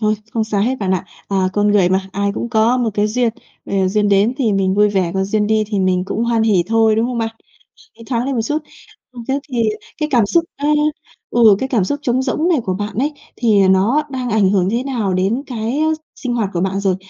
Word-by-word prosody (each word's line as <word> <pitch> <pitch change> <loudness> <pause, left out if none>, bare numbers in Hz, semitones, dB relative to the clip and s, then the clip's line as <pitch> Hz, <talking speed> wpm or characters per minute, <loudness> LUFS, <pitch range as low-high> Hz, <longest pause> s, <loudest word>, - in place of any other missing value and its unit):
thôi, 215 -1 +2 0.2
không 225 -1 0
sao 215 -2 -1
hết, 250 +5 +1
bạn 195 -3 -2
ạ. 185 -2 0 0.2
À, 190 -2 +1
con 205 +1 +1
người 195 -4 +4
mà, 190 +1 0
ai 200 +1 -1
cũng 235 - -3
có 230 +1 +2
một 240 -3 0
cái 210 0 +2
duyên. 235 +2 +1 0.4
Ờ, 195 -1 0
duyên 205 +1 +1
đến 200 +5 +3
thì 240 -7 +1
mình 190 -1 +1
vui 210 +1 +4
vẻ, 190 -4 0
còn 190 0 0
duyên 210 +1 0
đi 215 0 +2
thì 205 -1 -2
mình 185 -1 +1
cũng 220 +4 -2
hoan 230 -1 +1
hỉ 210 -5 +3
thôi, 225 -1 +3
đúng 225 +1 +2
không 245 -1 -3
bạn? 225 0 -3 0.6
Nghĩ 230 - -13
thoáng 240 -1 -1
lên 275 - -1
một 230 - 0
chút. 295 +7 -1 0.5
Ừm, 240 -2 -9
thế 275 +1 0
thì 240 -2 +1 0.4
cái 305 -1 -1
cảm 235 -5 +4
xúc 335 +10 +2
á 285 - -3 0.6
ừ, 225 -4 +5
cái 265 - -2
cảm 230 -8 +1
xúc 285 +10 -2
trống 255 -2 +1
rỗng 295 +6 0
này 340 -4 +3
của 185 - -1
bạn 205 +2 -4
ấy, 290 +4 0 0.2
thì 205 -5 +3
nó 200 +10 +3
đang 255 -2 -3
ảnh 210 -4 +3
hưởng 190 -2 +2
thế 235 +3 0
nào 235 -8 -2
đến 195 +8 0
cái 240 +3 -3 0.4
sinh 250 -2 -3
hoạt 220 -5 -1
của 170 - -1
bạn 190 +1 -1
rồi? 195 -2 +1
220 Hz, 250 wpm, -18 LUFS, 195-240 Hz, 0.6 s, ừ